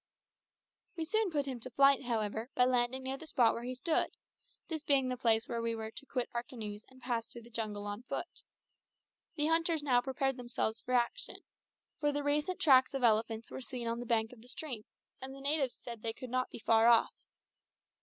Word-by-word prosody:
We 325 Hz, -2 st, -3 dB
soon 435 Hz, +4 st, +1 dB
put 290 Hz, -4 st, 0 dB
him 260 Hz, -3 st, -4 dB
to 255 Hz, -, -4 dB
flight, 275 Hz, +1 st, +4 dB
however, 220 Hz, 0 st, -1 dB
by 250 Hz, -, +5 dB
landing 250 Hz, +1 st, +1 dB
near 265 Hz, +1 st, -3 dB
the 320 Hz, -, -10 dB
spot 240 Hz, -6 st, +4 dB
where 235 Hz, -, -5 dB
he 250 Hz, +1 st, -4 dB
stood, 310 Hz, +6 st, +1 dB, 0.6 s
this 315 Hz, -2 st, -3 dB
being 275 Hz, -3 st, +3 dB
the 255 Hz, -, -1 dB
place 230 Hz, -2 st, +2 dB
where 235 Hz, -1 st, -2 dB
we 230 Hz, 0 st, -1 dB
were 220 Hz, 0 st, -5 dB
to 280 Hz, -, -8 dB
quit 250 Hz, -3 st, -1 dB
our 235 Hz, -, 0 dB
canoes 220 Hz, -4 st, -7 dB
and 260 Hz, 0 st, -18 dB
pass 235 Hz, -2 st, -1 dB
through 235 Hz, 0 st, -11 dB
the 235 Hz, -, -16 dB
jungle 210 Hz, -2 st, -3 dB
on 205 Hz, +2 st, -4 dB
foot. 250 Hz, -, -5 dB, 0.9 s
The 295 Hz, -, +1 dB
hunters 325 Hz, -1 st, +2 dB
now 250 Hz, -4 st, +4 dB
prepared 270 Hz, 0 st, -1 dB
themselves 240 Hz, -2 st, -2 dB
for 255 Hz, -, -1 dB
action, 245 Hz, -, -1 dB, 0.6 s
for 295 Hz, -1 st, +2 dB
the 290 Hz, 0 st, -2 dB
recent 295 Hz, +5 st, 0 dB
tracks 265 Hz, -1 st, +5 dB
of 270 Hz, -, -2 dB
elephants 225 Hz, 0 st, +2 dB
were -, -, -6 dB
seen 250 Hz, -2 st, -5 dB
on 230 Hz, 0 st, -1 dB
the 245 Hz, -, -6 dB
bank 225 Hz, 0 st, +1 dB
of 235 Hz, -, -15 dB
the 240 Hz, -, -15 dB
stream, 250 Hz, -4 st, -5 dB, 0.4 s
and 265 Hz, +1 st, -6 dB
the -, -, -10 dB
natives 280 Hz, -2 st, +1 dB
said 235 Hz, -3 st, -8 dB
they 225 Hz, 0 st, -2 dB
could 250 Hz, +2 st, -9 dB
not 255 Hz, 0 st, 0 dB
be -, -, -8 dB
far 225 Hz, 0 st, +4 dB
off. 235 Hz, -1 st, +5 dB
250 Hz, 215 wpm, -33 LUFS, 230-275 Hz, 0.9 s, by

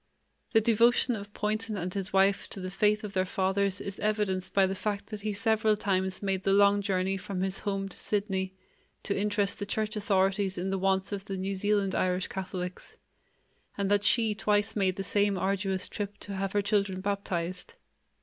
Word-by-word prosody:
The 225 Hz, -, +6 dB
devotion 235 Hz, +2 st, +4 dB
of 205 Hz, -1 st, -8 dB
Poynton 215 Hz, +1 st, -2 dB
and 180 Hz, 0 st, -3 dB
his 195 Hz, -2 st, -3 dB
wife 195 Hz, +1 st, +3 dB
to -, -, -5 dB
the 185 Hz, 0 st, -5 dB
faith 210 Hz, +2 st, +2 dB
of 205 Hz, -2 st, -6 dB
their 185 Hz, -, +2 dB
fathers 190 Hz, +1 st, 0 dB
is 200 Hz, 0 st, -6 dB
evidenced 195 Hz, -3 st, 0 dB
by 195 Hz, 0 st, +4 dB
the 190 Hz, -, -1 dB
fact 205 Hz, +2 st, -3 dB
that 210 Hz, -1 st, -5 dB
he 215 Hz, +1 st, -2 dB
several 220 Hz, 0 st, +2 dB
times 190 Hz, -1 st, -1 dB
made 195 Hz, -1 st, 0 dB
the 195 Hz, -, +2 dB
long 200 Hz, 0 st, +5 dB
journey 195 Hz, -1 st, 0 dB
from 190 Hz, -1 st, -4 dB
his 190 Hz, 0 st, +1 dB
home 195 Hz, -2 st, -2 dB
to 195 Hz, -, -10 dB
Sydney 190 Hz, -2 st, -1 dB, 0.5 s
to 200 Hz, -, -1 dB
interest 205 Hz, 0 st, 0 dB
the 205 Hz, -, -2 dB
church 215 Hz, +2 st, -1 dB
authorities 195 Hz, -1 st, +1 dB
in 185 Hz, +2 st, -2 dB
the 195 Hz, -, -1 dB
wants 190 Hz, +1 st, +1 dB
of 200 Hz, -1 st, -4 dB
the 195 Hz, -1 st, -4 dB
New 190 Hz, +1 st, -2 dB
Zealand 200 Hz, 0 st, +1 dB
Irish 185 Hz, 0 st, 0 dB
Catholics, 185 Hz, -1 st, -5 dB, 0.8 s
and 200 Hz, 0 st, 0 dB
that 205 Hz, 0 st, +3 dB
she 225 Hz, 0 st, +4 dB
twice 205 Hz, +1 st, +1 dB
made 190 Hz, -3 st, +1 dB
the 195 Hz, -, -3 dB
same 200 Hz, 0 st, +1 dB
arduous 190 Hz, 0 st, -1 dB
trip 205 Hz, -1 st, -5 dB
to 200 Hz, -, -6 dB
have 195 Hz, 0 st, -2 dB
her 205 Hz, -1 st, +2 dB
children 200 Hz, -2 st, +1 dB
baptized. 190 Hz, -, -3 dB
200 Hz, 195 wpm, -29 LUFS, 190-205 Hz, 0.8 s, The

